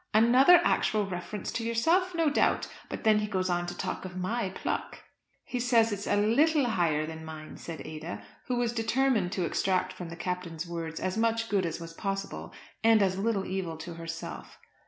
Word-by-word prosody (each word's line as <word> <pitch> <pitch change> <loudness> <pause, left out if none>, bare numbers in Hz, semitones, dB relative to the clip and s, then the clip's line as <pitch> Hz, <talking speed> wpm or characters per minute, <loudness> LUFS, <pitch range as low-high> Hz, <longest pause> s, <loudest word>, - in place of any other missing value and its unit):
"Another 255 +10 +7
actual 215 -1 +2
reference 190 +2 -5
to 230 - -3
yourself, 330 +11 +2
no 325 -3 +2
doubt. - - +2 0.2
But - - -5
then 215 -1 +5
he 210 - -1
goes 185 -3 -1
on 175 0 0
to 175 0 -6
talk - - -3
of 185 -1 -7
my 195 +3 -1
pluck." 190 - -4 0.4
"He 250 - -4
says 235 -2 +3
it's 205 0 -4
a - - +2
little 275 +8 +3
higher 170 -9 +1
than 160 0 -7
mine," 155 -1 -8
said 165 -3 -7
Ada, 155 +2 -6 0.2
who 250 - 0
was 240 -1 0
determined 230 -4 +1
to 185 -3 0
extract 185 +3 0
from 175 -2 -7
the 165 - -7
Captain's 175 -2 -4
words 165 -1 -4
as 185 +3 -2
much 225 0 +1
good 195 -3 +1
as 165 - -4
was 165 0 -8
possible, 195 +2 -4 0.3
and 225 -2 +6
as 190 0 0
little 200 -2 0
evil 185 -4 -3
to 170 +2 -7
herself. 165 0 -7
195 Hz, 195 wpm, -29 LUFS, 175-230 Hz, 0.4 s, Another